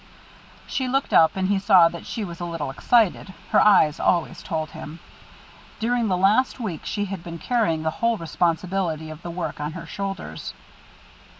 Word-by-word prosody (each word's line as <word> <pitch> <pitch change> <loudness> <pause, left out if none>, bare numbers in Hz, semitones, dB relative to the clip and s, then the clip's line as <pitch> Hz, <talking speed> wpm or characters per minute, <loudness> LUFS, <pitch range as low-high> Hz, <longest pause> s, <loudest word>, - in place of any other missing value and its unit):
She 260 - -2
looked 270 +2 -1
up, 160 -1 +5
and 190 -1 0
he 200 0 +2
saw 190 -4 +6
that 170 - -9
she 220 -3 -3
was 170 -2 -8
a 175 - -3
little 165 -5 -4
excited; 200 - +1 0.2
her - - +5
eyes 165 -7 +5
always 170 -3 0
told 160 -4 -3
him. 155 +2 -9 0.8
During 235 0 +1
this 185 -2 +1
last 210 +9 +2
week 190 -10 -5
she 205 -1 -1
had 190 -3 -6
been 170 -1 -7
carrying 165 -5 0
the 160 - 0
whole 230 -1 +2
responsibility 165 0 -1
of 155 +1 -10
the 175 - -7
work 170 -2 -4
on 150 +1 -3
her 165 -1 -7
shoulders. 195 +4 -6
180 Hz, 180 wpm, -23 LUFS, 165-205 Hz, 0.8 s, saw